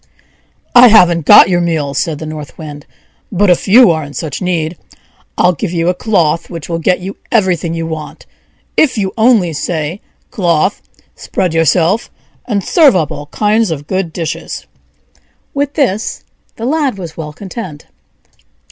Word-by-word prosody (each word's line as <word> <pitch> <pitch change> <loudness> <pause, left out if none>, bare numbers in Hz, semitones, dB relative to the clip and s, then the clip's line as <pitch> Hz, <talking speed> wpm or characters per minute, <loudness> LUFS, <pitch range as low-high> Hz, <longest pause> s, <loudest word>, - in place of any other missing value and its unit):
"I 245 0 +9
haven't 175 -8 +4
got - - +9
your 175 -1 +1
meal," 160 -5 -1
said 155 +2 -1
the 160 - -7
North 155 -2 -8
Wind; 150 -2 -9 0.4
"but 200 -1 +3
if 175 - 0
you 230 0 +7
are 160 -1 -1
in 145 0 -10
such 155 -5 -5
need, 175 -2 -1 0.6
I'll 180 0 +3
give 170 +3 -4
you 170 0 0
a - - +2
cloth 170 -5 0
which 165 -4 -7
will 165 -1 -3
get 180 +2 +1
you 195 +2 -7
everything 180 -7 +1
you 165 0 -3
want, 160 -2 -7 0.5
if 290 -6 +2
you 195 -2 -1
only 220 -7 +3
say, 160 +4 -3 0.3
'Cloth, 175 +1 0 0.3
spread 180 -4 -3
yourself, 165 - +2 0.4
and 205 -5 -1
serve 295 - +4
up 160 -6 0
all 145 - -7
kinds 215 +6 +1
of 145 -3 -4
good 185 0 -2
dishes!'" 165 -1 -5 0.9
With 285 0 -2
this 230 -8 -1 0.3
the 225 - -6
Lad 280 -4 0
was 170 -4 -8
well 155 -2 -6
content. 185 -2 -8
175 Hz, 160 wpm, -14 LUFS, 160-205 Hz, 0.9 s, I